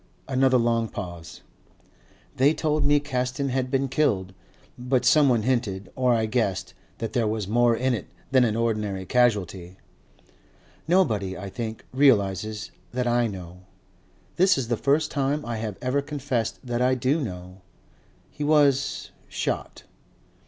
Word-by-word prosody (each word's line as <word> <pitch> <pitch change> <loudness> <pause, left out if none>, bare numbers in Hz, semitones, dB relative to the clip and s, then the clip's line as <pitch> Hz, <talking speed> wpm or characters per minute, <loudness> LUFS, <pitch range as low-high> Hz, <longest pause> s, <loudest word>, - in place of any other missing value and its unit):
Another 130 -1 +3
long 115 -1 +1
pause. 85 -4 -8 0.9
"They 140 +4 +3
told 155 -1 0
me 145 0 +4
Caston 130 -1 -2
had 130 0 -1
been 135 0 +1
killed. 100 -10 0 0.4
But 125 +1 0
someone 130 -7 +4
hinted 110 -6 -1
or 125 -1 +2
I 110 -1 +1
guessed 110 -5 -1 0.2
that 115 - -4
there 115 -3 +1
was 105 -2 -2
more 120 +2 +3
in 130 +2 0
it 110 - -4 0.2
than 130 -2 +5
an 110 -3 +1
ordinary 105 -4 -1
casualty. 95 -6 0 1.1
"Nobody, 110 - +1
I 95 +1 -7
think, 115 -1 -5
realizes 110 -6 +2 0.2
that 125 0 -1
I 120 0 +2
know. 90 -3 -8 0.8
This 185 0 +4
is 120 -4 -3
the 120 - +2
first 145 +6 +1
time 140 +2 -1
I 115 -1 -3
have 110 -3 -4
ever 130 +3 +1
confessed 140 -5 -2
that 120 -1 -2
I 130 +1 +3
do 130 +6 +1
know. 90 -5 -7 0.7
He 150 - -5
was 145 -3 +2 0.2
shot. - - -4
120 Hz, 145 wpm, -25 LUFS, 105-135 Hz, 1.1 s, than